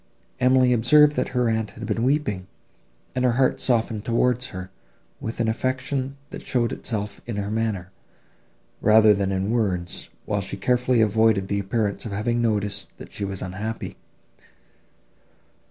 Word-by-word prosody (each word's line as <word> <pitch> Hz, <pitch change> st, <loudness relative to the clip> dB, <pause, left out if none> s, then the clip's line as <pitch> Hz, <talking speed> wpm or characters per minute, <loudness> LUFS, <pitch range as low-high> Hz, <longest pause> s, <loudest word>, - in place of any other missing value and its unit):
Emily 130 Hz, 0 st, +4 dB
observed 150 Hz, +6 st, +5 dB
that -, -, 0 dB
her 125 Hz, -1 st, 0 dB
aunt 110 Hz, -1 st, 0 dB
had 115 Hz, -, -6 dB
been 115 Hz, -, -1 dB
weeping, 120 Hz, -8 st, 0 dB, 0.7 s
and 130 Hz, -, -1 dB
her 125 Hz, -2 st, +3 dB
heart 130 Hz, +1 st, +2 dB
softened 115 Hz, -4 st, 0 dB
towards 125 Hz, +2 st, +1 dB
her, 95 Hz, 0 st, -8 dB, 0.5 s
with 115 Hz, +1 st, -5 dB
an 115 Hz, -, +1 dB
affection, 130 Hz, +3 st, -2 dB
that -, -, -7 dB
showed 120 Hz, -2 st, 0 dB
itself 105 Hz, -3 st, -4 dB
in 115 Hz, -, -3 dB
her 100 Hz, 0 st, -3 dB
manner, 110 Hz, -5 st, -2 dB, 0.9 s
rather 110 Hz, 0 st, +6 dB
than 100 Hz, -1 st, 0 dB
in 95 Hz, +2 st, -1 dB
words, 95 Hz, -7 st, -1 dB, 0.2 s
while -, -, -1 dB
she -, -, -5 dB
carefully 125 Hz, -1 st, +2 dB
avoided 110 Hz, -2 st, +3 dB
the 100 Hz, -, 0 dB
appearance 100 Hz, +1 st, -1 dB
of 105 Hz, -, -6 dB
having 120 Hz, +4 st, 0 dB
noticed, 105 Hz, -3 st, -1 dB
that -, -, -11 dB
she 105 Hz, -, -5 dB
was 95 Hz, -2 st, -4 dB
unhappy. 105 Hz, +5 st, -5 dB
110 Hz, 155 wpm, -24 LUFS, 100-125 Hz, 0.9 s, rather